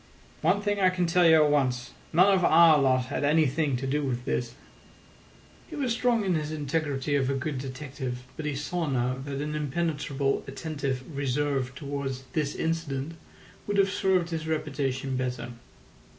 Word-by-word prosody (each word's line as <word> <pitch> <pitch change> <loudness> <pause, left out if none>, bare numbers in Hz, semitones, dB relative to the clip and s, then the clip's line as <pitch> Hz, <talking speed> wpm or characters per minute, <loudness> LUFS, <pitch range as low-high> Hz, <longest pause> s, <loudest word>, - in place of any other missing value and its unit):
"One 205 - +2
thing 205 0 0
I 185 -1 +5
can 180 -1 0
tell 175 +1 +4
you 160 -1 +7
at 150 - +2
once: 130 -4 0 0.2
none 185 +5 +5
of 185 -2 +2
our 160 -2 +7
lot 130 -2 +3
had - - -1
anything 150 -2 +2
to 135 - -4
do 145 +3 0
with 125 -2 -2
this." 120 -1 -2 1.1
He 320 - -7
was 265 -6 0
strong 235 -2 +1
in 185 - +2
his 155 -2 -2
integrity 145 -2 -2
of 135 -2 +1
a 135 - 0
good 135 0 -3
detective, 130 -1 -6
but 155 - -4
he 145 - -2
saw 165 +4 -2
now 130 0 0
that 140 -1 -4
an 150 +1 -3
impenetrably 145 -2 -1
attentive 140 -5 -3
reserve 135 -1 -1
towards 140 -1 -4
this 150 -3 -1
incident 160 -2 -2 0.5
would 205 0 -1
have 195 -1 +4
served 185 -3 +1
his 160 -1 -3
reputation 135 -4 -2
better. 125 -1 -3
145 Hz, 170 wpm, -27 LUFS, 135-165 Hz, 1.1 s, you